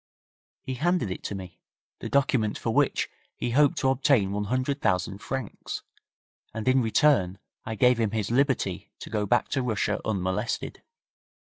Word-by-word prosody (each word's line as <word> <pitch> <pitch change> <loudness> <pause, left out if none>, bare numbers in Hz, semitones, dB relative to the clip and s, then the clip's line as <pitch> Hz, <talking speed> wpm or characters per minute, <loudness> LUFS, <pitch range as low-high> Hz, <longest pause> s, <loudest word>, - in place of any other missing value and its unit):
He 130 - -4
handed 170 - 0
it - - -5
to 100 - -3
me, 90 -3 -9 0.4
the - - -5
document 130 -6 +2
for - - -2
which - - +2 0.3
he 120 - -2
hoped 145 +5 +4
to 135 - +2
obtain 130 -6 +3
one 105 +1 -1
hundred 130 +5 -1
thousand 95 +2 0
francs, 130 -1 -5 0.7
and 110 +2 -4
in 130 0 +5
return 110 - +3 0.3
I 110 - -3
gave 125 +2 +4
him 110 -2 +2
his 110 0 -2
liberty 125 - +1
to - - -9
go 105 -2 0
back 120 +4 +2
to 135 - 0
Russia 115 -4 0
unmolested. 100 +2 -2
115 Hz, 160 wpm, -27 LUFS, 100-135 Hz, 0.7 s, in